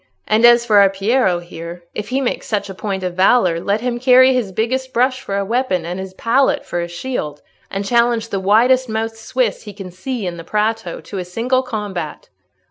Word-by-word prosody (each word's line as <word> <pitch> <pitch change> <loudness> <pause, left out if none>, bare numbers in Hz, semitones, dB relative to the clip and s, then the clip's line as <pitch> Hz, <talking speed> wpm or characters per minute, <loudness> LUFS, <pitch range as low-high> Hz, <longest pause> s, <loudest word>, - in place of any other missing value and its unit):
And 220 +2 +4
as 240 0 +6
for 210 -3 +5
our 200 -1 +6
Piero 195 0 +1
here, 170 0 -9
if 210 - -5
he 265 +2 0
makes 250 - -2
such 205 -2 -2
a - - -7
point 190 0 -4
of 180 -1 -2
valour, 185 -2 +3
let 200 +5 -1
him 245 -1 -2
carry 255 +1 +6
his 240 -6 -1
biggest 255 +6 -2
brush 255 +2 +1
for 200 -6 -3
a 200 - -1
weapon 220 -6 0
and 175 +2 -4
his 190 0 -7
palette 255 +6 +1
for 175 - -3
a 170 - -3
shield, 170 - -5 0.3
and 195 +1 -4
challenge 235 0 +2
the 195 - -2
widest 240 +6 +3
mouthed 225 +1 -2
Swiss 235 -1 -1
he 210 - -10
can 195 -2 -9
see 230 +4 -5
in 175 -1 -4
the 165 - -8
Prato 220 +4 -2
to 200 - -7
a - - -3
single 235 +8 0
combat." 205 - -5
215 Hz, 210 wpm, -18 LUFS, 185-245 Hz, 0.3 s, as